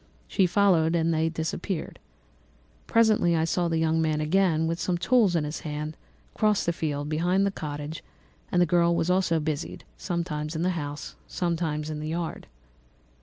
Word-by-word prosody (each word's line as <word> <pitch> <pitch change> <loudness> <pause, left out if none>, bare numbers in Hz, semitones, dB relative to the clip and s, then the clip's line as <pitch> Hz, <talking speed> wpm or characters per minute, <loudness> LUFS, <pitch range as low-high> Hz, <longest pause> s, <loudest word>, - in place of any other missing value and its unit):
She 190 -3 +2
followed, 175 -4 +3
and 165 0 +2
they 160 0 +1
disappeared. 160 +2 -4 0.9
Presently 215 -7 +4
I 160 - +2
saw 175 +1 0
the 165 -1 0
young 160 0 +2
man 155 -1 +1
again, 160 0 +2
with 165 +1 -1
some 175 0 0
tools 215 -2 +3
in 165 - +2
his 150 +1 -4
hand, 150 0 -5 0.4
cross 210 -1 +2
the 170 - +1
field 145 -3 -2
behind 175 +6 +1
the 200 - +1
cottage; 150 -2 -6 0.5
and 180 - +2
the 175 - +5
girl 170 0 +3
was 170 +1 +1
also 180 -3 +2
busied, 155 0 -4
sometimes 165 -3 -3
in 160 - -1
the 185 - +2
house 145 -4 -5
and - - -28
sometimes 160 -3 -1
in 150 - -4
the 155 - -4
yard. 165 0 -4
165 Hz, 175 wpm, -27 LUFS, 155-180 Hz, 0.9 s, the